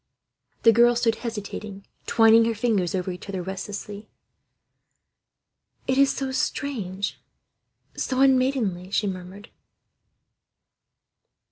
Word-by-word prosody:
The 230 - +8
girl 240 +2 +5
stood 230 -2 +1
hesitating, 210 -3 -6 0.2
twining 225 0 +6
her 230 0 0
fingers 205 -6 0
over 185 0 -2
each 180 +2 -9
other, 190 -2 -3
restlessly. 200 +2 -7 1.8
"It 260 +1 +1
is 275 0 +5
so 270 -1 -3
strange, 215 -8 -3 0.7
so 260 -1 -2
unmaidenly," 255 -9 +2
she 205 - 0
murmured. 190 +2 -7
215 Hz, 100 wpm, -24 LUFS, 195-240 Hz, 1.8 s, The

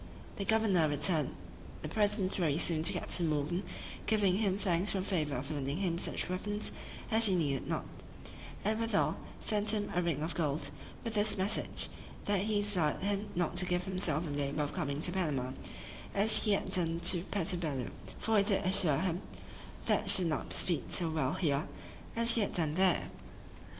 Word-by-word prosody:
" - - -18
The 200 - -3
governor 200 -6 +3
returned 150 +2 +1 0.5
the - - -3
present 205 -3 +1
very 160 -6 +1
soon 165 -2 +2
to 165 - +1
Captain 170 -3 0
Morgan, 155 +4 -1 0.5
giving 200 -4 +2
him 200 -3 0
thanks 190 -1 0
for 195 - -1
the 185 - -3
favor 155 -8 -1
of 135 +4 -4
lending 140 0 -3
him 175 -3 -1
such - - 0
weapons 205 +3 0 0.4
as 220 0 +4
he 190 - +2
needed 140 -6 -1
not; - - -2 0.8
and, 215 +1 0
withal, 230 0 0 0.2
sent 210 0 +1
him 205 -1 -3
a 180 - +1
ring 165 -4 -1
of 165 - -2
gold, 150 -2 -1 0.3
with 230 - -4
this 210 0 +2
message, 190 +2 +1 0.4
"that 205 -2 +1
he 210 0 0
desired 180 -8 +2
him 200 +1 -1
not 175 -1 -1
to 180 - +4
give 180 0 0
himself 180 -4 0
the 150 - -5
labor 145 +1 -2
of 145 - -4
coming 145 -5 -3
to 175 - +3
Panama, 150 -9 -1 0.6
as 210 +3 +5
he 210 - +3
had 200 - -1
done 165 -2 0
to 175 -1 +5
Puerto 195 -2 -2
Bello: 145 -7 -3 0.3
for 220 -1 +2
he - - +3
did 200 -1 +1
assure 185 -6 +3
him, 185 +1 -1 0.7
he - - +4
should 185 - +9
not 160 -2 -2
speed 170 -5 -2
so 170 -3 0
well 145 -5 0
here, 150 -2 0 0.5
as 230 0 +5
he 230 - +3
had 200 - -1
done 160 -4 0
there." 185 0 +1
180 Hz, 190 wpm, -32 LUFS, 155-205 Hz, 0.8 s, should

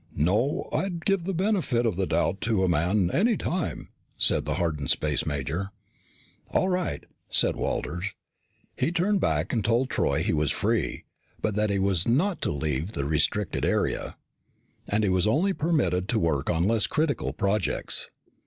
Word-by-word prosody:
"No. 110 - +1
I'd 175 -4 -2
give 195 -4 +1
the 195 - -1
benefit 175 - +1
of 110 -6 +1
the 95 0 -1
doubt 95 +3 0
to 110 -4 +1
a - - +3
man 90 +3 +2
any 220 +3 +3
time," 175 -3 -3 0.3
said - - +2
the - - -1
hardened 75 -5 -1
space 75 -1 0
major. 75 +6 -2 0.8
"All 185 - +1
right," 180 -1 -1 0.3
said - - +2
Walters. 90 +3 -2 0.7
He - - 0
turned 190 +3 +1
back - - 0
and 115 -4 +1
told 120 +5 +1
Troy - - +1
he - - 0
was 75 -2 +1
free, - - 0 0.4
but 110 - -1
that 105 +1 +1
he 100 - +1
was 95 -3 +1
not 165 +11 +1
to - - 0
leave 75 +5 -2
the 70 - -2
restricted 80 +6 0
area. - - 0 0.7
And 105 +1 +1
he 100 - +2
was 95 +1 +2
only 170 - +2
permitted 105 - 0
to 115 - +1
work 75 -6 0
on 85 -1 +2
less 110 +2 +2
critical 155 -2 0
projects. 100 -1 0
105 Hz, 170 wpm, -26 LUFS, -, 0.8 s, a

